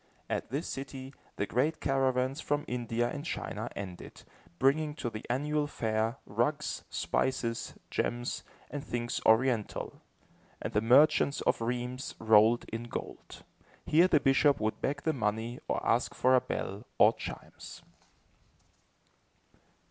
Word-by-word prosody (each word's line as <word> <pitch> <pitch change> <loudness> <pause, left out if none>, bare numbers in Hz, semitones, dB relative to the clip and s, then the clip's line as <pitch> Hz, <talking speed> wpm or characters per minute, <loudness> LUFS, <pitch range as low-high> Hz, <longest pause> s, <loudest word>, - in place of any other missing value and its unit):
At - - -2
this 140 +7 -2
city, 135 0 -6 0.2
the 100 - -1
great 145 +9 0
caravans 135 0 +1
from 145 0 -1
India 120 -1 -1
and 145 +3 -5
China 170 - -4
ended, 95 -3 -8 0.3
bringing 150 - +2
to 120 -6 -3
the 110 0 -6
annual 145 +4 0
fair, 110 -2 -1
rugs, 140 +9 -1
spices, 120 -3 -1 0.2
gems, 120 0 -2 0.3
and 145 -1 -4
things 120 0 -3
Oriental, 115 -1 +2 0.6
and - - -5
the 105 - +3
merchants 140 +4 +5
of - - +1
Rheims 125 +2 -3
rolled 110 +1 +5
in 115 +1 -3
gold. 120 - -7 0.4
Here 170 +4 +5
the 155 - +4
bishop 140 +1 +4
would 110 0 -2
beg 145 +1 -1
the 160 - +1
money, 115 0 -2
or - - 0
ask - - +1
for 130 - +3
a 130 - +6
bell, 100 +5 -4
or - - +7
chimes. - - -9
125 Hz, 135 wpm, -31 LUFS, 115-140 Hz, 0.6 s, or